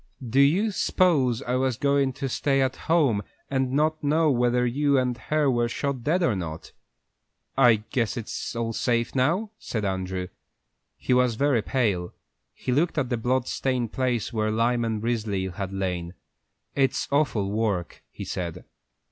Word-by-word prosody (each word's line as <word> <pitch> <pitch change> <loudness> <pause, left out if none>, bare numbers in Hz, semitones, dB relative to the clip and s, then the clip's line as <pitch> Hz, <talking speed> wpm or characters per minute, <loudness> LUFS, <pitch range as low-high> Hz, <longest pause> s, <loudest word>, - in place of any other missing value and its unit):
"Do 125 +4 +1
you 180 +11 +4
s'pose 140 - +2
I 125 - -2
was 130 -3 0
goin' 140 -2 +2
to 140 0 -3
stay 135 +1 +1
at 130 -1 -1
home, 145 -10 +2 0.3
and 130 -1 0
not 155 +3 +1
know 155 +1 +3
whether 125 -1 +2
you 140 +3 +2
and 125 -1 +1
her 150 +3 0
were 120 -2 +2
shot 135 0 -3
dead 175 +6 +1
or 125 -10 +2
not?" 80 -4 -6 0.8
"I 110 -3 +5
guess 120 -2 0
it's 115 +1 -5
all 115 -1 -2
safe 120 0 0
now," 170 +12 +1
said 110 -3 -3
Andrew. 95 -1 -3 0.7
He - - 0
was 125 -2 +3
very 135 -2 +2
pale. 100 -9 -1 0.4
He - - -3
looked 155 +6 +1
at 135 -4 0
the - - +2
blood 125 +2 0
stained 125 -4 -1
place 125 -3 -1
where 110 -1 0
Lyman 115 0 0
Risley 110 -5 -1
had 95 +1 -5
lain. 90 -2 -3 0.6
"It's 135 -1 +1
awful 120 -9 +1
work," 105 -5 -1
he - - -8
said. 85 -3 -5
125 Hz, 160 wpm, -25 LUFS, 110-140 Hz, 0.8 s, I